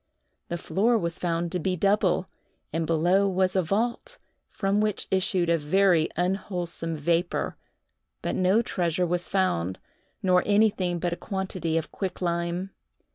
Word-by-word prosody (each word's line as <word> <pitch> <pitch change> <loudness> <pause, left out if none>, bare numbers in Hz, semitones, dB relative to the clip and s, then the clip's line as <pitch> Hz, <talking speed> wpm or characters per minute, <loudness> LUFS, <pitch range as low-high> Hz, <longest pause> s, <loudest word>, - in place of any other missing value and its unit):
The 170 - -3
floor 220 +7 +2
was 170 -5 -2
found 170 -1 -1
to 180 - -1
be 185 +2 0
double, 195 -1 +2 0.5
and 165 0 -1
below 175 +5 +3
was 185 0 +1
a 190 - +4
vault, 215 +8 -2 0.3
from 200 +1 0
which 215 -2 -1
issued 185 -2 +1
a 170 0 +2
very 170 +1 +3
unwholesome 175 -2 -2
vapor, 170 +4 0 0.7
but - - -1
no 190 +5 +3
treasure 175 -3 0
was 175 0 -1
found, 95 - 0 0.5
nor 180 -1 +4
anything 200 -4 +2
but 175 0 -1
a - - -5
quantity 185 -5 -2
of 160 - -3
quicklime. 175 0 -2
180 Hz, 140 wpm, -26 LUFS, 170-195 Hz, 0.7 s, a